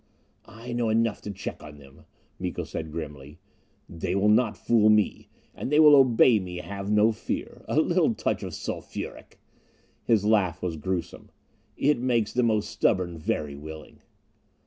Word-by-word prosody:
"I 115 Hz, +3 st, -9 dB
know 120 Hz, -2 st, 0 dB
enough 115 Hz, 0 st, +1 dB
to 105 Hz, -, -6 dB
check 95 Hz, -1 st, -7 dB
on 75 Hz, -1 st, -11 dB
them," 70 Hz, +2 st, -17 dB, 0.3 s
Miko -, -, -3 dB
said 80 Hz, -1 st, -6 dB
grimly. 75 Hz, -2 st, -8 dB, 0.5 s
"They 85 Hz, +2 st, -4 dB
will 100 Hz, +2 st, +3 dB
not 110 Hz, 0 st, +3 dB
fool 110 Hz, -2 st, +3 dB
me. 105 Hz, -1 st, +1 dB, 0.2 s
And -, -, -5 dB
they 150 Hz, -, +4 dB
will 150 Hz, -2 st, +8 dB
obey 125 Hz, -3 st, +5 dB
me, 90 Hz, -2 st, -7 dB
have 100 Hz, +2 st, -6 dB
no 105 Hz, +1 st, +4 dB
fear. 110 Hz, -, -5 dB
A -, -, +1 dB
little -, -, +2 dB
touch -, -, -2 dB
of -, -, -6 dB
sulphuric -, -, -7 dB, 0.4 s
" -, -, -38 dB
His 105 Hz, -3 st, +3 dB
laugh 95 Hz, -6 st, +1 dB
was 90 Hz, -3 st, -2 dB
gruesome. 90 Hz, +3 st, -4 dB, 0.5 s
"It 145 Hz, -2 st, +2 dB
makes 120 Hz, -4 st, 0 dB
the 125 Hz, -, +2 dB
most 110 Hz, -3 st, 0 dB
stubborn 90 Hz, -4 st, 0 dB
very 75 Hz, -2 st, -2 dB
willing." 80 Hz, +2 st, -10 dB
105 Hz, 165 wpm, -26 LUFS, 80-115 Hz, 0.5 s, will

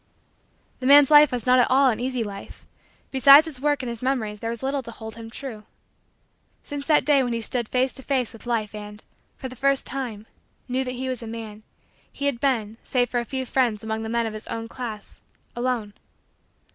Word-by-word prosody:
The 255 Hz, -, -2 dB
man's 285 Hz, +1 st, +7 dB
life 295 Hz, 0 st, +8 dB
was 245 Hz, -3 st, -3 dB
not 255 Hz, 0 st, +5 dB
at 245 Hz, -, +3 dB
all 265 Hz, 0 st, +5 dB
an 220 Hz, -, -4 dB
easy 250 Hz, -1 st, -1 dB
life. 200 Hz, -2 st, -9 dB, 0.5 s
Beside 275 Hz, +3 st, +8 dB
his 290 Hz, -6 st, -9 dB
work 290 Hz, -2 st, +1 dB
and -, -, -4 dB
his 235 Hz, -1 st, -6 dB
memories 235 Hz, -5 st, -1 dB
there 230 Hz, -, -4 dB
was 235 Hz, +1 st, -6 dB
little 275 Hz, +1 st, -1 dB
to 235 Hz, -, -10 dB
hold 220 Hz, -1 st, -9 dB
him 225 Hz, -1 st, -9 dB
true. 225 Hz, -3 st, -7 dB, 1.0 s
Since 285 Hz, -1 st, -6 dB
that 305 Hz, -2 st, +4 dB
day 290 Hz, -2 st, +4 dB
when 245 Hz, -2 st, -1 dB
he 230 Hz, -, -2 dB
stood 235 Hz, +1 st, -2 dB
face 255 Hz, +1 st, +1 dB
to -, -, -9 dB
face 260 Hz, -3 st, -1 dB
with 225 Hz, +1 st, -13 dB
Life 220 Hz, -3 st, -1 dB
and, 210 Hz, 0 st, -9 dB, 0.3 s
for 265 Hz, -, -6 dB
the 255 Hz, -, -10 dB
first 275 Hz, +1 st, +2 dB
time, 240 Hz, -5 st, -5 dB, 0.4 s
knew 255 Hz, +1 st, -1 dB
that 250 Hz, -1 st, -5 dB
he 260 Hz, +1 st, -4 dB
was 255 Hz, -2 st, -2 dB
a 230 Hz, -, -7 dB
man, 220 Hz, -2 st, -7 dB, 0.5 s
he 280 Hz, -, -5 dB
had 280 Hz, -4 st, 0 dB
been, 225 Hz, -6 st, 0 dB
save 245 Hz, -2 st, 0 dB
for 245 Hz, -, +1 dB
a 235 Hz, -, -3 dB
few 260 Hz, +2 st, -4 dB
friends 240 Hz, -5 st, 0 dB
among 220 Hz, 0 st, -3 dB
the 220 Hz, -, -5 dB
men 235 Hz, 0 st, 0 dB
of 220 Hz, -, -4 dB
his 215 Hz, -, -9 dB
own 225 Hz, 0 st, -5 dB
class, 230 Hz, -3 st, -8 dB, 0.3 s
alone. 240 Hz, -4 st, -2 dB
245 Hz, 220 wpm, -24 LUFS, 225-265 Hz, 1.0 s, life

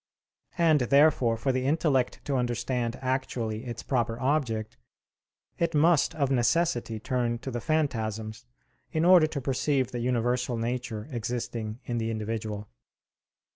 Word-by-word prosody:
And, 165 Hz, -3 st, +4 dB
therefore, 130 Hz, -2 st, +4 dB
for 135 Hz, +4 st, 0 dB
the 130 Hz, 0 st, -1 dB
intellect 140 Hz, -4 st, +1 dB
to 140 Hz, -, -1 dB
understand 120 Hz, -1 st, -1 dB
actually 125 Hz, -3 st, -2 dB
its 120 Hz, -2 st, -6 dB
proper 120 Hz, -3 st, -1 dB
object, 120 Hz, -5 st, -1 dB, 0.8 s
it 170 Hz, -1 st, 0 dB
must 160 Hz, 0 st, +4 dB
of 140 Hz, -3 st, 0 dB
necessity 120 Hz, -2 st, +1 dB
turn 120 Hz, 0 st, -1 dB
to 130 Hz, +3 st, -6 dB
the 120 Hz, -1 st, -3 dB
phantasms 110 Hz, -, -2 dB, 0.4 s
in 160 Hz, +1 st, +1 dB
order 180 Hz, -3 st, +7 dB
to 155 Hz, -2 st, -4 dB
perceive 135 Hz, 0 st, 0 dB
the 120 Hz, -, -3 dB
universal 120 Hz, 0 st, 0 dB
nature 115 Hz, -1 st, -3 dB
existing 115 Hz, -1 st, -4 dB
in 120 Hz, -1 st, -2 dB
the 115 Hz, 0 st, -1 dB
individual. 110 Hz, -1 st, -4 dB
125 Hz, 135 wpm, -28 LUFS, 115-140 Hz, 0.8 s, order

